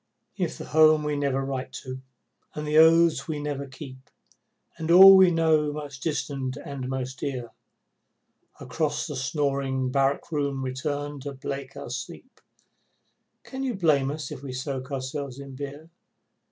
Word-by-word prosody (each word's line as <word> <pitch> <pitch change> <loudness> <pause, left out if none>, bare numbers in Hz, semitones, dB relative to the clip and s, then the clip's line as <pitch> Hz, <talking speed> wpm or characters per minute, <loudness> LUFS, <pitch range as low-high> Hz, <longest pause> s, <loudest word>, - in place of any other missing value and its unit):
If 175 -5 -2
the - - -7
home 155 0 +5
we 150 0 -1
never 135 -1 -1
write 135 -1 -4
to, 130 0 -7 0.5
and 150 - -4
the 150 +1 +4
oaths 165 -3 +5
we 155 - -3
never 145 -1 -4
keep, 130 -1 -11 0.7
And 160 0 -4
all 190 +3 +10
we 190 -1 +7
know 160 -3 +2
most 145 -2 -7
distant 140 -4 -3
and 140 -3 -6
most 130 -1 -4
dear, 125 -4 -4 1.1
Across 155 -2 -2
the 150 - -5
snoring 135 -1 -1
barrack 135 +4 0
room 140 -3 -1
return 145 +2 -3
to 140 +1 -6
break 135 0 -6
our - - -7
sleep, 170 - -8 1.0
Can 265 0 -7
you 260 -4 -1
blame 150 -7 +2
us 150 -1 -5
if - - -7
we 135 -2 -7
soak 130 0 -5
ourselves 135 0 -4
in 140 -1 -9
beer? 145 +4 -8
140 Hz, 155 wpm, -26 LUFS, 135-155 Hz, 1.1 s, all